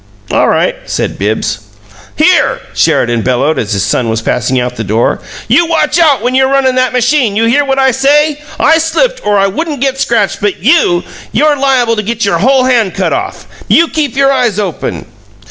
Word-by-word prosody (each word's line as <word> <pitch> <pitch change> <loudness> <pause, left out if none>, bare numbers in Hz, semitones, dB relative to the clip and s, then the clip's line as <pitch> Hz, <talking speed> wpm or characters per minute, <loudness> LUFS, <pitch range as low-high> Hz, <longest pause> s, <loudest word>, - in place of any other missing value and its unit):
"All - - +2
right," - - +1
said - - -3
Bibbs. 110 +2 -2 0.6
"HERE!" - - +2
Sheridan 120 -1 +1
bellowed, 130 +6 0
as 110 -1 -3
his 100 -1 0
son 120 -3 -1
was 110 0 -2
passing 125 +3 -1
out 125 0 -2
of 125 - -17
the - - -2
door. 110 +3 -1 0.3
"You 345 - +3
watch 325 -1 +1
out 290 -9 +3
when 250 +1 0
you're 265 0 +3
runnin' 270 -1 +2
that 255 0 +1
machine! 250 -3 +1
You 225 +2 +1
hear 270 +6 +2
what 270 -1 -1
I 265 -1 +3
say? 290 +3 +1 0.2
I 320 +2 +3
slipped, - - -1
or 205 -1 +1
I 195 - +3
wouldn't 290 - -3
got 270 0 -1
scratched, 225 -7 0
but 205 -3 -2
you 230 - +2 0.3
YOU'RE 300 0 +2
liable 260 -4 +1
to - - 0
get 225 +1 -2
your 200 - 0
whole 260 +3 +3
hand 235 -7 +1
cut 190 -2 -1
off! 370 +3 -4 0.2
You 335 0 +3
keep 290 -6 -2
your 275 0 +3
eyes 240 -6 0
open!" 195 -6 -4
250 Hz, 200 wpm, -11 LUFS, 190-285 Hz, 0.6 s, You